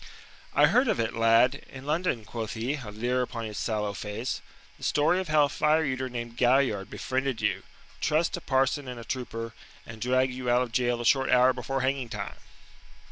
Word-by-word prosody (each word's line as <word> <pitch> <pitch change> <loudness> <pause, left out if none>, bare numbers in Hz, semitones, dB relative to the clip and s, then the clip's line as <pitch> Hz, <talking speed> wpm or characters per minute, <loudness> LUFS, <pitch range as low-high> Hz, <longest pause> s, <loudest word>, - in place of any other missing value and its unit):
"I - - +7
heard 255 +1 +4
of 220 - +1
it, 115 0 0
lad, 115 +3 +4 0.2
in 135 0 -10
London," 150 -7 -1
quoth 110 0 -5
he, 115 +5 -1
a 130 -8 -6
leer 120 +4 -1
upon 120 -2 -4
his 105 -2 -5
sallow 105 -2 -1
face 105 +4 -4 0.4
"the - - -13
story 150 +5 +2
of 190 - -3
how 155 -1 +4
a - - -3
fire 155 +2 +2
eater 130 -1 -2
named 120 -1 -6
Galliard 120 -6 +2
befriended 130 -2 -2
you, - - 0 0.4
trussed 155 +2 +1
a 175 - -7
parson 135 0 +1
and 125 -1 -6
a - - -8
trooper, 115 -2 -5 0.3
and 110 -1 -10
dragged 130 +1 +2
you 125 -1 -3
out 120 +1 +4
of 120 - -6
jail 120 0 +1
a - - -4
short 135 +3 +3
hour 125 +1 +5
before 130 +2 -3
hanging 130 -2 -1
time." - - -5
125 Hz, 200 wpm, -28 LUFS, 115-135 Hz, 0.4 s, I